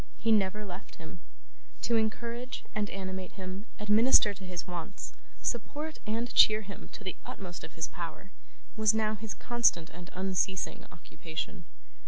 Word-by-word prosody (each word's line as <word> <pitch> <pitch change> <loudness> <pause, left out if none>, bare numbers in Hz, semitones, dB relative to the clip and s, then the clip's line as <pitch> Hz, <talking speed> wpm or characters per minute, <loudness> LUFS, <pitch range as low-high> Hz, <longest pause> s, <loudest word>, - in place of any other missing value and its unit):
He 225 - +2
never 210 0 +3
left 185 +1 -8
him. 165 +2 -10 0.6
To 235 - +3
encourage 235 +3 -1
and 210 -2 0
animate 190 -1 -4
him, 190 +2 -6
administer 210 +1 +6
to 195 0 -11
his 180 -2 -3
wants, 175 +2 -5 0.3
support 295 +6 -2
and 230 +3 -1
cheer 215 0 +8
him 200 -1 -9
to - - -7
the 185 - -3
utmost 180 -3 -7
of - - -8
his 165 - -1
power, 175 +2 -6 0.4
was 220 -1 +5
now 215 -1 +2
his 215 0 -5
constant 235 -9 +3
and 180 +1 -9
unceasing 190 0 0
occupation. 165 +1 -6
200 Hz, 150 wpm, -31 LUFS, 185-220 Hz, 0.6 s, cheer